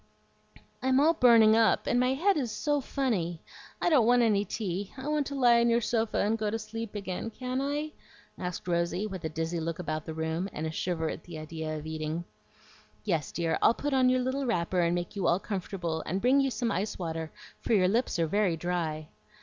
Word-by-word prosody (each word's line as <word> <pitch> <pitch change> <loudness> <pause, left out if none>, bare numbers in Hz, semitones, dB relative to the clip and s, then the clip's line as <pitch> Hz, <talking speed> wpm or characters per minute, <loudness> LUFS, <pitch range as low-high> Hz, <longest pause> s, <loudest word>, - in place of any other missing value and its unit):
"I'm 260 +1 +3
all 315 +3 +5
burning 230 -6 +6
up, 225 -1 +3
and 245 - +2
my 250 +1 +2
head 390 +8 +2
is 255 -7 -1
SO 290 +7 0
funny. 205 - -1 0.4
I - - 0
don't 255 -8 +5
want 245 0 +5
any 205 -3 +3
tea. 200 -2 -4
I 265 +2 -6
want 300 -2 0
to 280 - -5
lie 240 -3 +5
on 235 0 +3
your 235 0 +4
sofa 225 -1 0
and 220 +2 +1
go 210 -1 0
to 225 - -1
sleep 225 0 -6
again. 200 +2 -4
Can 255 +3 -3
I?" 295 +2 -2 0.4
asked 180 0 -5
Rosy, 170 +3 0
with 190 -4 -6
a - - -1
dizzy 165 +2 -2
look 165 0 -3
about 155 -3 -4
the 160 - -5
room, 160 +4 -2
and 155 - -4
a 160 - -2
shiver 165 0 -2
at 160 - -5
the 170 -2 -8
idea 155 0 -5
of 150 - -8
eating. 155 +1 -3 0.8
"Yes, 165 -8 -1
dear, 165 -2 -1
I'll 230 - +5
put 290 -1 -2
on 260 -1 +4
your 255 0 +2
little 260 +2 -1
wrapper, 180 -4 0
and 170 0 +2
make 175 +3 -4
you 195 - 0
all 175 - +3
comfortable, 180 -5 -3
and 185 +4 -1
bring 260 +6 +4
you 270 - +1
some 235 -1 -1
ice 200 +2 -2
water, 165 -2 -4 0.3
for 235 - -1
your 185 -3 +4
lips 230 +3 +1
are 165 - +2
very 185 0 +1
dry." 160 -3 -2
200 Hz, 220 wpm, -29 LUFS, 170-245 Hz, 0.8 s, burning